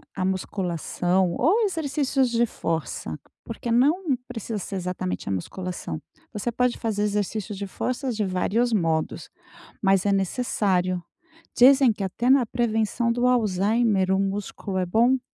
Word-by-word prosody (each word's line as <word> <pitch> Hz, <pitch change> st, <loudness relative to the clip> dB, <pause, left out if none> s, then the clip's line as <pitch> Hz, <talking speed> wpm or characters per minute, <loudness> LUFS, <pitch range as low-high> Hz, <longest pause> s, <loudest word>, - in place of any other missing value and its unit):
a 185 Hz, -, -2 dB
musculação 185 Hz, -1 st, 0 dB
ou 370 Hz, -, +3 dB
exercícios 285 Hz, -7 st, 0 dB
de 235 Hz, 0 st, +2 dB
força, 165 Hz, -6 st, -3 dB, 0.3 s
porque 230 Hz, +1 st, -6 dB
não 290 Hz, +5 st, +3 dB
precisa 225 Hz, -3 st, -5 dB
ser 195 Hz, -, -6 dB
exatamente 180 Hz, 0 st, -3 dB
a -, -, -1 dB
musculação. 180 Hz, -, -5 dB, 0.3 s
Você 210 Hz, +3 st, -2 dB
pode 250 Hz, +1 st, +1 dB
fazer 210 Hz, -2 st, -1 dB
exercícios 210 Hz, 0 st, -2 dB
de 200 Hz, 0 st, -4 dB
forças 255 Hz, +4 st, -3 dB
de 210 Hz, -2 st, 0 dB
vários 215 Hz, +6 st, 0 dB
modos, 165 Hz, -5 st, -1 dB, 0.5 s
mas 195 Hz, -1 st, +3 dB
é 200 Hz, -, +3 dB
necessário. 190 Hz, -3 st, 0 dB, 0.5 s
Dizem 265 Hz, 0 st, +7 dB
que 205 Hz, -, -5 dB
até 235 Hz, +7 st, -1 dB
na 265 Hz, -3 st, +5 dB
prevenção 230 Hz, 0 st, 0 dB
do 245 Hz, +1 st, +1 dB
Alzheimer 210 Hz, -3 st, +2 dB
o 190 Hz, -, +2 dB
músculo 195 Hz, 0 st, -3 dB
é 185 Hz, -, +1 dB
bom! 235 Hz, +8 st, +3 dB
210 Hz, 140 wpm, -25 LUFS, 185-245 Hz, 0.5 s, Dizem